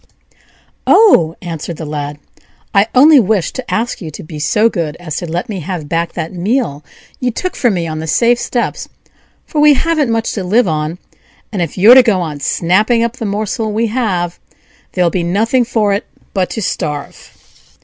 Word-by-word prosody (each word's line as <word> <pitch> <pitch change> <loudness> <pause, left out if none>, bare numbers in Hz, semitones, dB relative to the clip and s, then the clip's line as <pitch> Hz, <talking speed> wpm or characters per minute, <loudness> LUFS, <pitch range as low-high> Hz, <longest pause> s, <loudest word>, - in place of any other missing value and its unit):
"Oh!" 175 - +5
answered 165 -1 -5
the 160 - -6
Lad, 145 -1 -4 0.6
"I 200 +1 +4
only 290 +3 +7
wished 205 -5 0
to 260 - -6
ask 230 0 -2
you 165 - -6
to 155 - -9
be 155 -1 -8
so 210 +9 +2
good 165 -8 -3
as 160 -4 -6
to 175 - -4
let 175 +7 -2
me 205 -5 -4
have 165 -2 -5
back 165 +2 -1
that 160 - -5
meal 180 - -1 0.4
you 250 - 0
took 365 +10 -4
from 235 -6 +1
me 170 -2 -1
on 155 -1 -4
the 160 - -5
safe 235 +9 +3
steps, 240 -1 -2 0.6
for 300 - -1
we 300 -1 +6
haven't 315 -2 +1
much 225 0 0
to 200 - -3
live 215 +5 +2
on; 155 +1 -2 0.5
and 200 -5 -2
if 170 +1 -3
you're 210 +6 +8
to 260 - +9
go 220 -6 +1
on 155 -4 -4
snapping 210 - +2
up 235 +1 -2
the 225 - -4
morsel 215 +2 -2
we 220 +2 0
have, 180 -8 -1 0.5
there'll 180 -2 +2
be 180 - -1
nothing 220 +9 +1
for 215 -4 +1
it 200 - -3 0.3
but 185 -2 0
to 220 - -4
starve." 150 -5 -5
195 Hz, 190 wpm, -15 LUFS, 165-235 Hz, 0.6 s, to